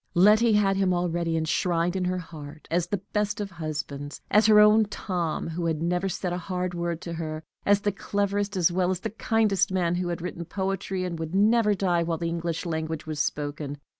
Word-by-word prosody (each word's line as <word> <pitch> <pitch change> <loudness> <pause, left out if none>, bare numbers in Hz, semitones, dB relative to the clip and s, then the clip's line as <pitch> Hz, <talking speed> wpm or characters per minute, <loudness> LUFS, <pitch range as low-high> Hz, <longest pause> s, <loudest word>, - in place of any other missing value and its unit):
_ - - -64
Letty 215 +5 +6
had 195 -2 +3
him 190 -2 +2
already 170 -1 0
enshrined 170 +2 0
in 185 -1 0
her 185 0 0
heart 155 -3 -9
as 175 +1 +1
the 195 0 -3
best 210 0 0
of 205 -2 -4
husbands 150 -4 -5
as 210 +1 +5
her 215 -1 +7
own 210 +1 +6
Tom, 180 -6 -3
who 165 +1 -2
had 160 -1 -1
never 180 +3 0
said 180 0 -3
a 175 - -2
hard 180 0 -3
word 170 -1 -3
to 170 - -5
her 155 -1 -4 0.2
as 205 0 +4
the 205 - +1
cleverest 200 0 -1
as 175 -1 +3
well 180 0 +1
as 185 -1 -1 0.2
kindest 210 -3 +2
of 190 - -3
men 175 -2 +1
who 175 0 -1
had 175 -1 -2
written 175 0 -5
poetry 190 0 -2
that 175 -2 -4
would 160 +2 -4
never 210 +1 +4
die 180 -3 +1
while 165 -1 -1
the 170 0 -2
English 170 0 -3
language 160 -1 -3
was 155 -1 -4
spoken. 145 -1 -2
180 Hz, 215 wpm, -26 LUFS, 165-195 Hz, 0.2 s, her